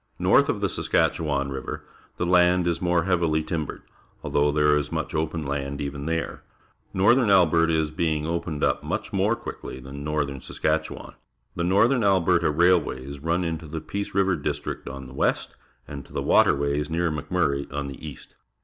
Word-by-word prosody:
North - - +4
of - - -1
the - - +2
Saskatchewan 70 -3 0
RiA'er, 65 -1 -5 0.3
the 85 - -1
land 90 0 +4
is 85 -1 -1
more 85 -2 +2
hea^'ih^ 85 -4 +1
timbered, 80 -3 -4 0.4
although 75 0 +2
there 75 0 +3
is 75 0 -1
much - - -3
open 80 0 -2
land 70 0 -3
even 70 0 -4
there. 80 0 -2 0.5
Northern 115 +6 +4
.Vlberta 85 -4 +4
is 80 -2 +1
being 80 -1 -1
opened 85 -2 -3
up - - +1
much - - -4
more - - +2
quickly 65 - -8
than 70 +2 -8
northern 70 -3 -2
Saskatchewan. 80 0 -2 0.4
The - - -3
Xorthern 115 +7 +3
Alberta 90 -4 +3
Railicatjs 75 -5 +1
run 85 +2 +1
into 80 -1 -4
the 80 +2 -5
Peace 100 +5 -5
River 95 -1 +3
District 75 - -4
on 70 0 -8
the 65 - -11
west, - - -1 0.3
and 70 -1 -7
to - - -17
Watcnmys, 70 +1 +2
near 85 +1 0
Mc^Murray, 70 -1 -1
on 70 0 -3
the 70 +2 -9
east. 75 -4 -10
80 Hz, 165 wpm, -25 LUFS, 70-85 Hz, 0.5 s, North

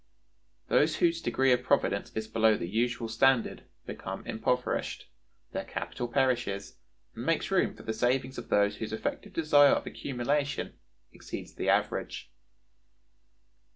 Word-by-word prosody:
Those 155 +2 +3
whose 170 -1 +2
degree 130 +1 +2
of 125 0 +3
providence 125 - +1
is 110 0 -3
below 110 -1 +3
the 85 - -4
usual 115 +4 -1
standard 120 +2 +2 0.2
become - - -6
impoverished, 125 +3 -1 0.4
their - - -3
capital 120 - -4
perishes, 120 -6 0 0.4
and 115 - -7
makes 165 +6 0
room 190 - +2
for - - -13
the 110 - -2
savings 125 +3 0
of 120 - -10
those 105 0 +2
whose 110 -1 -5
effective 185 - -4
desire 145 -4 +5
of - - -1
accumulation 140 +2 -2 0.4
exceeds - - -8
the - - -2
average. 80 - 0
125 Hz, 135 wpm, -29 LUFS, 110-140 Hz, 0.4 s, desire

